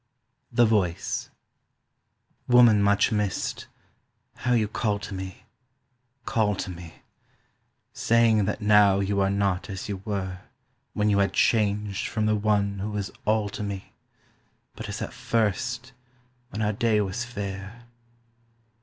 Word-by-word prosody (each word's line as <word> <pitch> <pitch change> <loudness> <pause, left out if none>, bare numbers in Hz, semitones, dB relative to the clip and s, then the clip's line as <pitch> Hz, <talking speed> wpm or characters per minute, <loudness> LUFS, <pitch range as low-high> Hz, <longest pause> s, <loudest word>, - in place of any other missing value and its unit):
THE 120 - +4
VOICE 100 -6 0 1.2
WOMAN 120 -4 +6
much 100 +3 +3
missed, 105 -3 -2 0.7
how 125 - 0
you 110 -3 +2
call 105 0 -1
to 105 0 -8
me, 95 -1 -7 0.8
call 105 -3 +1
to 95 - -4
me, 85 -2 -11 0.9
Saying 115 -3 +3
that 105 +2 -3
now 105 -2 +5
you 100 0 0
are 95 - +2
not 100 -1 0
as 95 0 -5
you 100 -2 -3
were 95 -3 -3 0.5
When 105 0 +1
you 100 - +3
had 100 - +2
changed 105 -2 +1
from 110 -1 -1
the 110 0 +2
one 100 -1 +1
who 105 +3 -3
was 105 -2 -4
all 110 -1 +2
to 105 - -7
me, 100 -2 -5 0.8
But - - -7
as - - -4
at - - -6
first, 120 +4 -1 0.6
when 110 -1 -3
our 105 0 +1
day 110 0 +2
was 105 +3 -2
fair. 100 -1 -6
105 Hz, 135 wpm, -26 LUFS, 100-110 Hz, 1.2 s, WOMAN